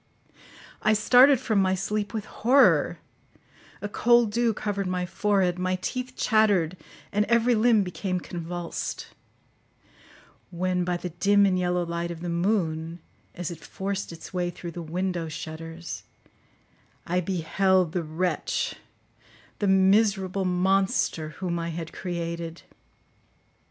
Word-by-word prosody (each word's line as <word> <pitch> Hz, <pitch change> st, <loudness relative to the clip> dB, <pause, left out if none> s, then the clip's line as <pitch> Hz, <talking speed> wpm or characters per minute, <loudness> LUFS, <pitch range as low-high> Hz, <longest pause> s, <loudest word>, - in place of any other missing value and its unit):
I 215 Hz, -, +3 dB
started 250 Hz, +5 st, +6 dB
from 220 Hz, -6 st, +1 dB
my 190 Hz, 0 st, +2 dB
sleep 205 Hz, +2 st, -2 dB
with 220 Hz, -2 st, -4 dB
horror; 260 Hz, +5 st, +3 dB, 0.9 s
a -, -, -1 dB
cold 235 Hz, +1 st, +3 dB
dew 235 Hz, +1 st, +2 dB
covered 200 Hz, -2 st, -3 dB
my 180 Hz, 0 st, -1 dB
forehead, 185 Hz, -1 st, +1 dB
my 185 Hz, 0 st, 0 dB
teeth 255 Hz, +6 st, -4 dB
chattered, 205 Hz, -7 st, +2 dB, 0.4 s
and 210 Hz, +1 st, +2 dB
every 235 Hz, +2 st, +3 dB
limb 225 Hz, -1 st, +4 dB
became 185 Hz, 0 st, -3 dB
convulsed; 175 Hz, 0 st, -5 dB, 1.4 s
when, 180 Hz, 0 st, -1 dB
by 175 Hz, 0 st, -1 dB
the 180 Hz, 0 st, -6 dB
dim 200 Hz, +4 st, +4 dB
and 190 Hz, -2 st, +2 dB
yellow 180 Hz, -1 st, 0 dB
light 170 Hz, 0 st, -3 dB
of 170 Hz, -1 st, -7 dB
the 175 Hz, -, -4 dB
moon, 170 Hz, -3 st, -1 dB, 0.4 s
as 175 Hz, -1 st, -4 dB
it 160 Hz, -3 st, -10 dB
forced 195 Hz, +5 st, -4 dB
its 165 Hz, -, -10 dB
way 180 Hz, -1 st, 0 dB
through 175 Hz, 0 st, -7 dB
the 170 Hz, -, -7 dB
window 175 Hz, +1 st, -2 dB
shutters, 165 Hz, +2 st, -7 dB, 1.0 s
I 180 Hz, +1 st, 0 dB
beheld 185 Hz, 0 st, +1 dB
the 175 Hz, -, -1 dB
wretch—the 175 Hz, +4 st, -4 dB
miserable 195 Hz, 0 st, +3 dB
monster 185 Hz, -3 st, +1 dB
whom 175 Hz, -2 st, -2 dB
I 165 Hz, 0 st, -3 dB
had 165 Hz, 0 st, -6 dB
created. 170 Hz, -2 st, -5 dB
185 Hz, 125 wpm, -26 LUFS, 170-205 Hz, 1.4 s, started